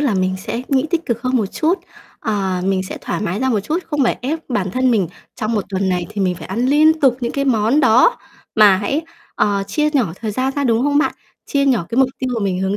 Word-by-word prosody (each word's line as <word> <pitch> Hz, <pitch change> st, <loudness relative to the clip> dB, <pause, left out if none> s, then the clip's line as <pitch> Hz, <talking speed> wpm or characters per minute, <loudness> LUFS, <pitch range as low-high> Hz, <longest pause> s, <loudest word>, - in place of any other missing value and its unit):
là 275 Hz, -8 st, +1 dB
mình 185 Hz, 0 st, 0 dB
sẽ 230 Hz, +5 st, -5 dB
nghĩ 270 Hz, +1 st, +2 dB
tích 340 Hz, -1 st, -1 dB
cực 235 Hz, -1 st, -2 dB
hơn 255 Hz, 0 st, +1 dB
một 220 Hz, -5 st, +1 dB
chút, 325 Hz, -, 0 dB, 0.4 s
ờ, 195 Hz, -4 st, -1 dB
mình 190 Hz, -1 st, +1 dB
sẽ 185 Hz, -, -7 dB
thoải -, -, -3 dB
mái 205 Hz, 0 st, -2 dB
ra 260 Hz, -, +1 dB
một 220 Hz, -5 st, +1 dB
chút, 300 Hz, -, -1 dB
không 295 Hz, -2 st, +1 dB
phải -, -, 0 dB
ép 305 Hz, +5 st, -1 dB
bản 205 Hz, -7 st, -1 dB
thân 255 Hz, +5 st, +1 dB
mình 200 Hz, -7 st, +1 dB, 0.3 s
trong 220 Hz, -1 st, -3 dB
một 210 Hz, -4 st, 0 dB
tuần 190 Hz, -1 st, -1 dB
này 180 Hz, -1 st, -1 dB
thì 210 Hz, -1 st, -4 dB
mình 185 Hz, -2 st, +1 dB
phải 165 Hz, -2 st, -9 dB
ăn 230 Hz, +7 st, -1 dB
liên 310 Hz, +3 st, +4 dB
tục 260 Hz, -3 st, +4 dB
những 235 Hz, -1 st, -2 dB
cái 275 Hz, -, -1 dB
món 240 Hz, +2 st, +2 dB
đó 255 Hz, -, +5 dB, 0.4 s
mà 210 Hz, -3 st, +6 dB
hãy, 215 Hz, +10 st, -1 dB, 0.3 s
ờ, 200 Hz, -1 st, +1 dB
chia 300 Hz, +10 st, 0 dB
nhỏ 255 Hz, -, +1 dB
thời 220 Hz, -1 st, -2 dB
gian 260 Hz, +5 st, -1 dB
ra, 285 Hz, -, 0 dB
đúng 230 Hz, -2 st, +2 dB
không 290 Hz, +1 st, +2 dB
bạn? 300 Hz, -, +2 dB, 0.3 s
Chia 280 Hz, -1 st, +1 dB
nhỏ 240 Hz, -10 st, +2 dB
cái 235 Hz, -, -2 dB
mục 265 Hz, -1 st, +5 dB
tiêu 260 Hz, -1 st, -2 dB
mà 225 Hz, -3 st, -1 dB
mình 185 Hz, -2 st, -1 dB
hướng 190 Hz, +1 st, 0 dB
230 Hz, 265 wpm, -19 LUFS, 195-270 Hz, 0.4 s, mà